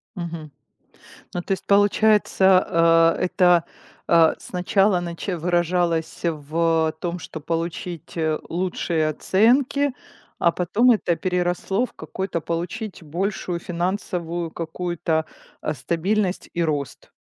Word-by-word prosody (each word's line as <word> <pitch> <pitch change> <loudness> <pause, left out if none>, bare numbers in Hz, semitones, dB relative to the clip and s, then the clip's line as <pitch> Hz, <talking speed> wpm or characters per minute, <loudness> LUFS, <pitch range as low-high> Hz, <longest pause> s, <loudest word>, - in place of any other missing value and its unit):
Мгм. 170 -4 -6 0.8
Ну, 175 - -2
то 175 - -7
есть 190 - -1
получается, 190 -5 +4
э, - - -5
это, 180 -2 +4 0.4
э, 165 -1 +5
сначала 190 +1 +1
начи 175 +2 -4
выражалось 175 -1 0
в, 160 0 +1
э, - - -6
том, 175 +1 -3
что 160 - -8
получить, 165 +1 -4
э, 160 -1 +1
лучшие 170 -2 -1
оценки, 255 - +2 0.5
а 170 - +4
потом 205 +9 +3
это 180 -7 +1
переросло 180 +5 0
в - - -15
какой-то 170 +2 -4
получить 180 +7 -4
большую 175 +2 -3
финансовую 175 -1 -3
какую-то, 165 -1 -2 0.4
а, - - -2
стабильность 180 - -1
и 170 - 0
рост. 145 -4 -3
175 Hz, 115 wpm, -23 LUFS, 165-190 Hz, 0.8 s, э